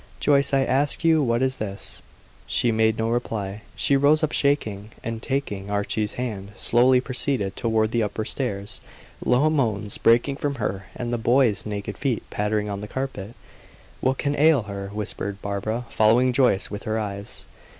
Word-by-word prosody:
"Joyce 140 -1 +3
I 135 -1 +3
ask 140 +5 +1
you 160 -1 +4
what 120 -2 +1
is 130 0 0
this?" 100 -2 -5 0.5
She 120 - +2
made 110 0 +2
no 115 0 0
reply. 105 -4 -3
She 140 - +2
rose 145 +3 +4
up 155 - +1
shaking; 110 -8 0
and, 115 0 -4
taking 110 -8 -3
Archie's 105 +1 -1
hand, 105 -5 -5
slowly 125 +2 +4
proceeded 125 -6 -1
toward 110 -1 +1
the 115 - +1
upper 110 0 -2
stairs, 100 -6 -3 0.4
low 125 +5 +3
moans 110 -8 -1
breaking 120 +4 +3
from 145 -1 -2
her, 100 -5 -3
and 120 0 -3
the 120 - -1
boy's 120 -2 +2
naked 105 -1 -5
feet 135 -5 -1
pattering 105 0 -1
on 100 -1 -4
the 105 - -6
carpet. 120 -4 -5 0.6
"What 130 +1 +1
can 145 0 -1
ail 150 -4 +5
her?" 100 -1 -6
whispered 100 -1 -4
Barbara, 105 +4 -3
following 120 +4 +4
Joyce 125 -7 +2
with 105 - -5
her 110 0 -2
eyes. 100 -2 -2
115 Hz, 170 wpm, -24 LUFS, 105-130 Hz, 0.6 s, ail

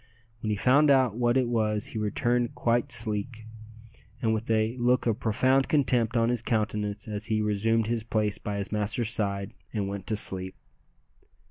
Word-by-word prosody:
When 110 - -3
he 105 - +1
found 140 +8 +4
out 130 -6 +3
what 120 +1 +1
it 130 -2 +1
was 110 -3 0
he 110 - -3
returned 120 +3 0
quite 120 0 0
sleek, 110 0 -2 0.7
and 110 -1 +1
with 110 +1 -4
a 110 +1 +1
look 125 +1 +2
of 115 -3 0
profound 130 +5 +2
contempt 125 -5 +1
on 115 0 +2
his 120 -2 0
countenance 105 -2 -2
as 105 -1 -5
he 110 -1 0
resumed 110 +2 +1
his 115 0 -2
place 110 -1 -1
by 105 -1 -4
his 100 -1 -4
master's 105 +2 0
side 100 -3 -2 0.2
and 105 -3 -2
went 100 -1 -6
to 110 - +1
sleep. 95 -2 +3
110 Hz, 175 wpm, -27 LUFS, 105-120 Hz, 0.7 s, found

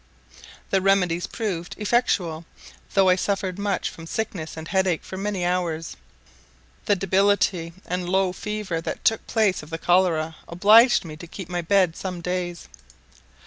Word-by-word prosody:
The 195 - +3
remedies 180 -3 +2
proved 185 -7 -4
effectual, 200 -7 0 0.5
though 195 -1 +5
I 180 - +5
suffered 190 0 -2
much 200 -2 -1
from 165 0 -11
sickness 180 -6 -4
and 160 0 -7
headache 190 -3 +1
for - - -8
many 195 -2 -2
hours. 170 -3 -1 0.9
The 205 - +3
debility 190 -3 +1
and 180 0 -3
low 190 -1 +2
fever 210 -5 -4
that - - -5
took 225 - +2
place 215 -5 +1
of 150 - -12
the 165 - -4
cholera 165 -3 +2
obliged 215 +6 +5
me 155 -2 -8
to 170 - -10
keep 180 +1 -8
my 175 -1 -2
bed 180 -1 +2
some 185 -2 -5
days. 175 0 -4
185 Hz, 150 wpm, -24 LUFS, 170-200 Hz, 0.9 s, though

